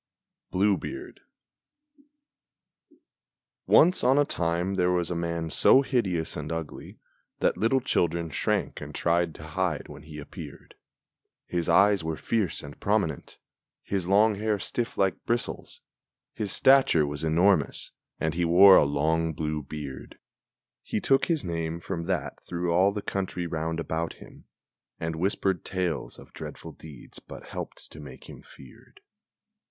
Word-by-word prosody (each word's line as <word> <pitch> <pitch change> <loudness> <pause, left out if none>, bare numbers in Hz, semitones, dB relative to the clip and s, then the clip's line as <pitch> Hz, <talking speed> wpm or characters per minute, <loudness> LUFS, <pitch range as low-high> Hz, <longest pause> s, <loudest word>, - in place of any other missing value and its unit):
BLUE 100 +2 +2
BEARD 360 +2 -8 2.5
Once 180 +3 +5
on 130 +3 +4
a 145 - +4
time 85 -2 -1
there 90 -2 +2
was 90 -1 0
a - - -1
man 85 -1 -3
so 135 - +5
hideous 95 - -1
and 75 +1 -5
ugly 80 -2 -6 0.4
That - - +1
little 130 +4 +2
children 85 -9 0
shrank - - -1
and - - -8
tried 85 -1 +1
to - - -11
hide 85 0 -2
when 75 -1 -10
he 75 0 -11
appeared; 75 - -10 0.7
His 85 -2 -2
eyes 100 -3 +4
were 80 -1 -3
fierce 110 -6 -1
and 70 0 -10
prominent, 100 -8 -1 0.5
his 95 -3 -2
long 105 +3 +4
hair 105 +1 -1
stiff 120 +6 -4
like 95 -1 0
bristles, 120 0 -3 0.5
His 105 -3 -3
stature 130 - +5
was 75 +2 -5
enormous, 85 +1 +2 0.3
and 80 0 -1
he 85 +1 -1
wore 95 +3 +8
a - - +5
long 80 +3 0
blue 75 0 -3
beard 70 -1 -8 0.6
He - - -3
took 135 +5 +3
his 160 -5 0
name 85 -1 -3
from 85 0 -5
that 90 -6 -3
through 85 0 -2
all 95 +3 +4
the 100 0 -5
country 95 -2 -3
round 80 0 -3
about 80 0 -3
him, - - -15 0.5
And 80 0 -3
whispered 95 0 0
tales 90 -5 -3
of - - -15
dreadful - - -8
deeds 75 -5 -12
but - - -12
helped - - -7
to 75 - -11
make 70 -4 -11
him - - -11
feared. 65 - -17
85 Hz, 145 wpm, -27 LUFS, 80-100 Hz, 2.5 s, wore